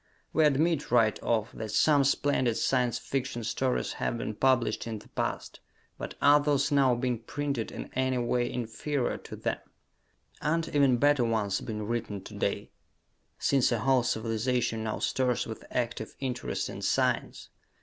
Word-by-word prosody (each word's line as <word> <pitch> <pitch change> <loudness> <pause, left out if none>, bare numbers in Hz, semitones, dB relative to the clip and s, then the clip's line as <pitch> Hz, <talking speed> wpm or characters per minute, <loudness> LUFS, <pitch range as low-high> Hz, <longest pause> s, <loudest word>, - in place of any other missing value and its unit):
We 160 - +4
admit, 150 +2 +2
right 115 -3 +3
off, 115 +1 0
that 110 -1 -6
some 145 -3 +4
splendid 135 -4 +2
Science 125 -3 +1
Fiction 130 -3 -3
stories 125 +3 -1
have 120 - 0
been 110 - -3
published 120 -2 +1
in 110 -1 -3
the - - -15
past - - -3 0.4
but - - -6
are 145 +1 +7
those 145 -1 +1
now 135 -3 +4
being 120 -1 -1
printed 140 -1 -3
in - - -7
any 130 0 +1
way 120 0 0
inferior 125 +3 -2
to - - -9
them? - - -2 0.8
Aren't 165 +1 0
even 140 -4 +3
better 145 0 +4
ones 110 -4 0
being 105 -1 -4
written 105 -3 -3
to - - -10
day? - - -2 0.7
since 135 -3 +2
a 120 - +2
whole 130 +1 +4
civilization 115 0 -1
now 110 - -2
stirs 125 -2 0
with 110 - -7
active 120 -3 -3
interest 125 -2 -2
in - - -7
science? - - 0
125 Hz, 160 wpm, -29 LUFS, 115-140 Hz, 0.8 s, are